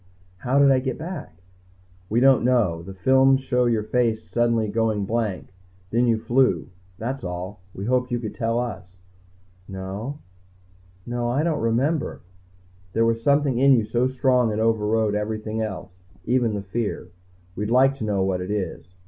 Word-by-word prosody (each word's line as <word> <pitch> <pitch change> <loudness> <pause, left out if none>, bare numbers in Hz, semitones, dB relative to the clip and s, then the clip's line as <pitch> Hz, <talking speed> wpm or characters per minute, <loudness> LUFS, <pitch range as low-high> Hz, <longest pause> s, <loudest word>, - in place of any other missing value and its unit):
"How 125 +8 0
did 140 -1 +6
I 130 - +4
get 130 -1 -3
back?" 155 - -8 0.7
"We 115 - +2
don't 135 -1 +5
know. 115 -10 +2
The 95 +3 -9
films 130 +6 +4
show 125 -1 +1
your 115 -3 +1
face 110 0 0
suddenly 115 -2 +1
going 110 -1 0
blank. 105 -4 -2 0.4
Then 120 +2 +2
you 115 -1 +3
flew. 120 +4 +1 0.3
That's 130 +4 -4
all. 90 +2 -5 0.2
We 95 - -5
hoped 125 +1 +1
you 120 - 0
could 110 -3 -5
tell 115 0 -1
us." 100 -6 -5 0.7
"No. 95 +8 -6 0.9
No 120 0 -2
I 135 +5 +1
don't 165 -2 0
remember 130 +8 0 0.3
" 90 0 -31
"There 115 +2 +2
was 115 0 +1
something 140 -1 +2
in 135 +1 +6
you 115 -4 +3
so 120 +3 +1
strong 125 -3 +2
it 105 - -2
overrode 110 -1 +1
everything 110 +1 -3
else, 95 -4 -5 0.3
even 120 -3 +1
the 100 - -4
fear. 100 -2 -3 0.5
We'd 105 +2 -3
like 130 +3 +4
to 135 - -5
know 100 -3 0
what 95 -1 -1
it 90 - -5
is. 95 -3 -4
115 Hz, 170 wpm, -23 LUFS, 105-125 Hz, 0.9 s, did